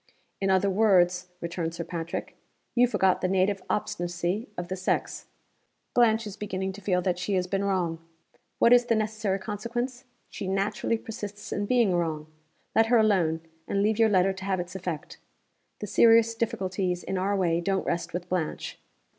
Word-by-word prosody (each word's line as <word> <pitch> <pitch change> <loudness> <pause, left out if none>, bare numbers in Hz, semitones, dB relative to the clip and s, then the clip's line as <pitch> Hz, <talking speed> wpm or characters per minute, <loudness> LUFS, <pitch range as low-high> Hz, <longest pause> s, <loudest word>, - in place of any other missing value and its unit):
"In 195 - 0
other 190 +1 +3
words," 185 -3 +3
returned 170 -1 -3
Sir 170 - -4
Patrick, 170 -1 -5 0.4
"you 245 0 +5
forgot 190 -6 +2
the - - +1
native 190 +1 +1
obstinacy 175 +2 -2
of 175 0 -4
the 185 - -3
sex. 185 0 -2 0.7
Blanche 230 -2 +4
is 205 -2 -6
beginning 190 -2 -3
to 205 - -11
feel 180 -2 +1
that 180 -1 0
she 190 +2 -1
has 180 -1 +1
been 195 +2 -1
wrong. 180 -4 0 0.6
What 235 - +6
is 245 0 +6
the 230 - +2
necessary 215 -2 -1
consequence? 235 +6 -4 0.2
She 195 - -6
naturally 195 +4 0
persists 210 -2 -7
in 205 0 -2
being 235 -6 +3
wrong. 160 -3 -1 0.5
Let 225 0 +5
her 240 +1 +5
alone, 185 -7 +2 0.3
and 200 0 +1
leave 215 +1 +1
your 225 -1 +5
letter 190 -1 +3
to 190 0 -8
have 190 -2 0
its 180 +1 -5
effect. 175 -5 -5 0.6
The - - -2
serious 230 +2 +5
difficulties 190 -5 -2
in 190 - -2
our 200 +2 +1
way 170 -3 +1
don't 195 +2 0
rest 170 0 -2
with 175 +1 -4
Blanche. 180 -4 -3
190 Hz, 175 wpm, -27 LUFS, 180-215 Hz, 0.7 s, What